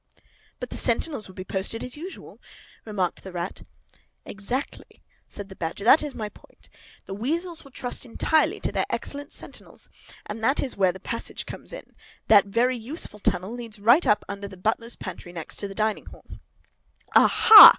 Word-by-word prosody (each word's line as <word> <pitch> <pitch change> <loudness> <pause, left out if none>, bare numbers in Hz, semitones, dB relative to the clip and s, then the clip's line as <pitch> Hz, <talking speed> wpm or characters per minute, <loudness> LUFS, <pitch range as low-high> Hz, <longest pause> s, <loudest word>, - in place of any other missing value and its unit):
"But - - -6
the - - -3
sentinels 285 -9 0
will 190 - -13
be 185 - -5
posted 190 +4 -2
as 250 - -2
usual," 350 +6 -9 0.4
remarked 195 -5 -1
the 190 - -7
Rat. 175 +1 -4 0.6
"Exactly," 240 +7 -5 0.2
said 205 -1 -8
the 190 - -11
Badger; 170 +3 -4
"that 255 +7 +7
is 295 -3 -4
my 215 - -3
point. - - -18 0.4
The 195 - -6
weasels 330 - -1
will 275 - -14
trust 250 -1 -3
entirely 300 +6 +2
to - - 0
their - - 0
excellent 285 +1 -3
sentinels. - - -6 0.4
And 220 +1 -6
that 265 +5 +3
is 265 - -1
where 190 -2 +4
the 190 - -10
passage 230 +4 -4
comes - - -8
in. - - -9 0.4
That 205 -3 +8
very 245 +5 +2
useful 235 - -3
tunnel 185 0 0
leads 235 -3 -7
right 240 +11 +5
up 210 - +3
under 200 0 -5
the 190 - -11
butler's 225 +5 -1
pantry, 180 -2 -7
next 165 -3 -6
to 200 - -2
the 195 - -9
dining 215 0 0
hall!" - - -13 0.9
"Aha! 435 -2 +11
220 Hz, 180 wpm, -26 LUFS, 195-260 Hz, 0.9 s, Aha